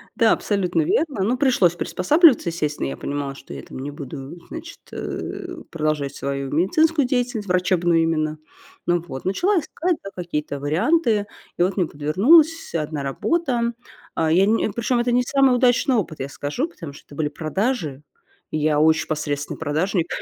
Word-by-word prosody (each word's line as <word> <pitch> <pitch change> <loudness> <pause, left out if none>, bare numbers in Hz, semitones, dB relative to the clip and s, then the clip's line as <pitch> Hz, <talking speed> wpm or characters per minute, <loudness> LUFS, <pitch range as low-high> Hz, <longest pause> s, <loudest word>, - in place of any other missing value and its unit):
Да, 230 -3 +4
абсолютно 180 -5 +1
верно. 270 - 0
Ну, 245 +5 +1
пришлось 245 - +3
приспосабливаться, 260 - +4
естественно. 150 - -2
Я 70 - -5
понимала, 140 -1 -4
что 70 - -11
я 70 - -7
там - - -9
не 140 +2 -5
буду, 140 +2 -8
значит, 330 +1 -8
э, 355 -3 -6
продолжать 155 -3 -1
свою 140 -1 -3
медицинскую 285 - +2
деятельность, 245 -4 -1
врачебную 175 -2 +2
именно. 155 -1 0 0.5
Ну 175 -1 +2
вот. 130 0 -7
Начала 350 - +2
искать, 340 +2 -2
да, 195 - -6
какие-то 150 -5 -3
варианты. 210 - +2 0.3
И - - -1
вот 190 +2 0
мне 175 -4 +2
подвернулась 265 - +3
одна 150 -2 -2
работа. 235 - 0 0.4
А 160 -1 +1
я 185 +4 +5
не 220 +1 +2
причём 240 +3 0
это 240 0 +1
не 250 +1 +3
самый 270 -1 +3
удачный 250 +1 +3
опыт, 175 -8 -2
я 135 +1 -4
скажу, 150 - -3
потому 165 - -9
что - - -15
это 145 - -13
были 150 -1 -1
продажи. 155 - -2 0.5
И 155 - -1
я 150 0 +2
очень 160 +1 +3
посредственный 145 -2 -3
продажник, 160 +3 0
175 Hz, 165 wpm, -22 LUFS, 150-245 Hz, 0.5 s, я